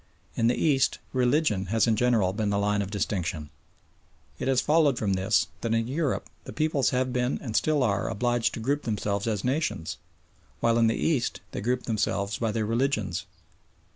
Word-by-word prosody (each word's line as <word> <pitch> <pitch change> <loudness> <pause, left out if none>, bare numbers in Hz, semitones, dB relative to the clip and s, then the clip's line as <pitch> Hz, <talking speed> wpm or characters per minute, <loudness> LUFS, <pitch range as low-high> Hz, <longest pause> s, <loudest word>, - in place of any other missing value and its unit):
In 115 - +2
the 120 - +3
East 135 -4 +2 0.2
religion 125 - +1
has 110 +3 +2
in 115 -2 +2
general 110 -5 +2
been 105 0 -1
the 100 - +1
line 100 0 +1
of 100 - -4
distinction. 90 -7 -3 0.9
It - - -2
has 135 -2 +3
followed 150 -1 +3
from 100 -3 0
this 95 -2 +2 0.2
that 115 -1 0
in 115 0 0
Europe 145 +1 -1 0.2
the - - -7
peoples 155 -4 +1
have 130 0 0
been 125 0 0
and 115 -5 -6
still 150 -3 +2
are 100 -5 0
obliged 120 +2 0
to - - -5
group 140 +6 0
themselves 105 -3 -2
as 105 -3 -1
nations, 130 - -1 0.6
while 115 0 +2
in 115 - +4
the 115 - +1
East 145 -7 0
they - - -4
group 125 +4 0
themselves 100 -2 -1
by 115 -2 0
their 110 0 -1
religions. 125 +6 -1
115 Hz, 185 wpm, -27 LUFS, 105-130 Hz, 0.9 s, in